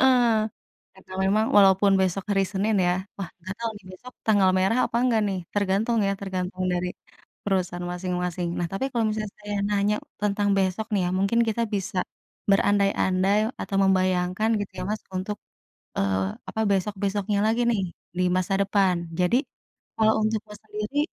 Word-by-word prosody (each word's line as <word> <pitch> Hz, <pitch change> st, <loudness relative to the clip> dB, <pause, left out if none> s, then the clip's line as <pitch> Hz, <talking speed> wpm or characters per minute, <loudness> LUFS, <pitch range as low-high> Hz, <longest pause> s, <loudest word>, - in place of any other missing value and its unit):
Heeh. 260 Hz, -1 st, +6 dB, 0.8 s
Karena 190 Hz, 0 st, -16 dB
memang 215 Hz, +3 st, +3 dB
walaupun 195 Hz, 0 st, +6 dB
besok 190 Hz, 0 st, 0 dB
hari 195 Hz, -1 st, +3 dB
Senin 210 Hz, +3 st, +1 dB
ya 175 Hz, -, +3 dB, 0.2 s
wah, 195 Hz, -4 st, -5 dB
nggak 185 Hz, +3 st, -6 dB
tahu 230 Hz, -1 st, -2 dB
nih 205 Hz, -, -14 dB
besok 250 Hz, +7 st, -12 dB
tanggal 200 Hz, -4 st, +5 dB
merah 190 Hz, +6 st, +2 dB
apa 235 Hz, -, -3 dB
enggak 240 Hz, -3 st, +3 dB
nih, 190 Hz, -, -2 dB, 0.2 s
tergantung 205 Hz, +3 st, +1 dB
ya, 195 Hz, -, +1 dB
tergantung 185 Hz, -1 st, -3 dB
dari 180 Hz, 0 st, -1 dB, 0.6 s
perusahaan 180 Hz, -3 st, -1 dB
masing-masing. 180 Hz, -1 st, -2 dB
Nah 175 Hz, -, 0 dB
tapi 195 Hz, +7 st, -2 dB
kalau 235 Hz, -2 st, +1 dB
misalnya 215 Hz, -1 st, -3 dB
saya 205 Hz, 0 st, -4 dB
nanya 205 Hz, +1 st, +2 dB, 0.3 s
tentang 205 Hz, 0 st, +1 dB
besok 190 Hz, +3 st, 0 dB
nih 200 Hz, -, +2 dB
ya, -, -, -2 dB
mungkin 200 Hz, +5 st, +2 dB
kita 225 Hz, +1 st, 0 dB
bisa 195 Hz, 0 st, -2 dB, 0.5 s
berandai-andai 195 Hz, -1 st, +3 dB, 0.2 s
atau 195 Hz, -, -3 dB
membayangkan 185 Hz, +1 st, +2 dB
gitu 205 Hz, -, -4 dB
ya -, -, -3 dB
Mas, 215 Hz, -, -2 dB, 0.2 s
untuk, 195 Hz, +3 st, -3 dB, 0.6 s
eee, 95 Hz, -1 st, +1 dB, 0.3 s
apa, -, -, -5 dB
besok-besoknya 200 Hz, +1 st, 0 dB
lagi 225 Hz, +2 st, +2 dB
nih, 210 Hz, -4 st, +1 dB, 0.4 s
di 185 Hz, -, +2 dB
masa 185 Hz, +1 st, 0 dB
depan. 195 Hz, -2 st, +2 dB, 0.2 s
Jadi, 180 Hz, +6 st, +3 dB, 0.6 s
kalau 220 Hz, 0 st, +4 dB
untuk 220 Hz, 0 st, +1 dB
Mas 210 Hz, 0 st, -10 dB
sendiri 210 Hz, +6 st, -5 dB
195 Hz, 160 wpm, -25 LUFS, 185-210 Hz, 0.8 s, Heeh